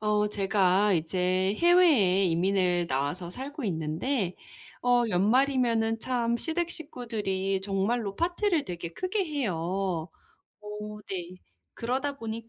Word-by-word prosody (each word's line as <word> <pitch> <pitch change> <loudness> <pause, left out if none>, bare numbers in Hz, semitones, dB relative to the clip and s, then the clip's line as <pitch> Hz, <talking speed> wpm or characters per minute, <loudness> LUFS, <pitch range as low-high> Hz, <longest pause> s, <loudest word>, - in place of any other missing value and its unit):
어 210 -1 +2
제가 195 0 +2
이제 185 +3 +1
해외에 300 - +5
이민을 180 0 +2
나와서 145 +7 -2
살고 275 - -6
있는데 180 - -1 0.5
어 245 -1 +4
연말이면은 225 +2 +2
참 235 -2 0
시댁 335 +3 -1
식구들이 210 - -3
정말로 200 +2 -1
파티를 350 -1 +1
되게 170 -2 -6
크게 375 - -1
해요. 280 - -2 1.0
어 210 0 -7
네 185 -1 -5 0.4
그러다 265 +4 -2
보니 225 0 -6
210 Hz, 245 characters per minute, -28 LUFS, 185-255 Hz, 1.0 s, 해외에